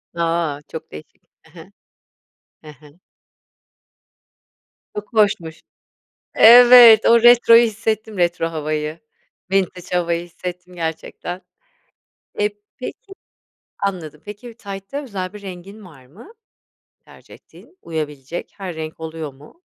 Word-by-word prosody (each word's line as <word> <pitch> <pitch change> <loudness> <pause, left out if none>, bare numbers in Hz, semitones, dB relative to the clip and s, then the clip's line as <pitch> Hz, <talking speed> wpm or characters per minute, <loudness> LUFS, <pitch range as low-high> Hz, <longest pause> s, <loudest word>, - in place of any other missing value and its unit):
A. 165 -3 -1
Çok 160 - -9
değişik, 75 - -13 0.2
he - - -23
he, - - -14 0.9
he 155 - -12
he. 150 +3 -20 2.0
Çok 210 +3 -8
hoşmuş. 185 -7 0 0.7
Evet, 240 -1 +9
o 235 0 +5
retroyu 240 -1 +7
hissettim 220 -1 -3
retro 175 -1 0
havayı, 155 0 -4 0.5
vintage 185 -2 -1
havayı 170 -1 -1
hissettim 180 +1 -9
gerçekten. 170 +2 -6 1.0
Eee, 210 0 +2 0.3
peki, 390 - -9 0.7
anladım 165 -6 -5
peki 210 +4 -10
bir 235 - -12
taytta 200 +6 -7
özel 195 -8 -6
bir 210 -1 -11
rengin 195 +2 -10
var 135 -8 -16
mı? 210 - -16 0.7
Tercih - - -17
ettiğin, 370 - -19
uyabilecek 150 -1 -6
her 190 -4 -6
renk 160 0 -7
oluyor 160 -2 -7
mu? 150 - -19
180 Hz, 110 wpm, -20 LUFS, 160-215 Hz, 2.0 s, Evet